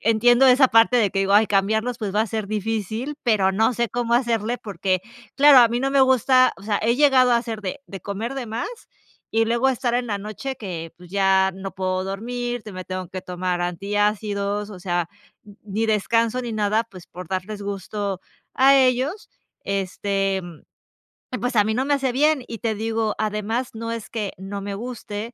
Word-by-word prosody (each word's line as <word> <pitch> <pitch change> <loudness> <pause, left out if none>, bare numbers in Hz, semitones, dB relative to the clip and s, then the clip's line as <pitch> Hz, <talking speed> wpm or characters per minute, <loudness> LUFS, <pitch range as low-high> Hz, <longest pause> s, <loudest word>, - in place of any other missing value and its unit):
entiendo 240 +4 +4
esa 260 +1 +6
parte 225 +2 +5
de 210 -4 +2
que 195 - -1
digo: 195 0 +1
"Ay, 210 +1 +6
cambiarlos, 220 +5 +1
pues 205 -3 -4
va 215 - +3
a 225 - +1
ser 215 -2 -3
difícil", 220 +5 -3
pero 210 -6 +3
no 220 +5 +2
sé 235 -1 -1
cómo 235 -1 -1
hacerle, 235 -1 0
porque, 185 -2 -2 0.4
claro, 285 -1 +8
a 235 -2 +7
mí 240 +2 -1
no 270 0 0
me 275 - +3
gusta 255 0 +4
O - - -15
sea, 205 -1 0
he 235 +2 +2
llegado 265 -4 +5
a - - +5
hacer 225 -2 -5
de 190 +8 -4
de 195 - -8
comer 220 +6 -4
de 260 -3 -4
más 230 - -3 0.6
y 225 0 +3
luego 235 +3 +2
estar 245 -2 0
en 245 0 0
la 205 -2 -2
noche 215 +7 -5
que, 170 -5 -6
pues 175 0 -15
ya 190 -1 +3
no 195 0 -7
puedo 185 0 -2
dormir, 240 +4 -4
que 210 - -9
me 185 -1 -7
tengo 185 -1 -5
que 185 -1 -7
tomar 180 0 -3
antiácidos, 205 +2 -1
o 190 - -9
sea, 175 -2 -1 0.4
n 205 -1 -15
ni 215 +2 -2
descanso 230 +3 +1
ni 235 -2 -4
nada, 215 +1 +1
pues 185 -5 -14
por 180 -1 -10
darles 195 +2 -4
gusto 200 -1 -4 0.3
a 275 +1 +6
ellos, 265 - +1 0.3
este, 195 0 -1
mm, 175 -3 -11 0.7
y - - -1
pues 245 0 -2
a 210 - +5
mí 220 - 0
no 255 +3 0
me 290 - +1
hace 265 -2 -1
bien. 295 -1 +2
Y 230 - -7
te 225 -2 -1
digo, 220 0 -1
además 215 +3 -2
no 230 +1 -5
es 225 -2 -6
que 215 -3 -3
no 195 +1 -6
me 200 0 -5
guste, 225 0 -6
215 Hz, 205 wpm, -23 LUFS, 195-240 Hz, 0.7 s, claro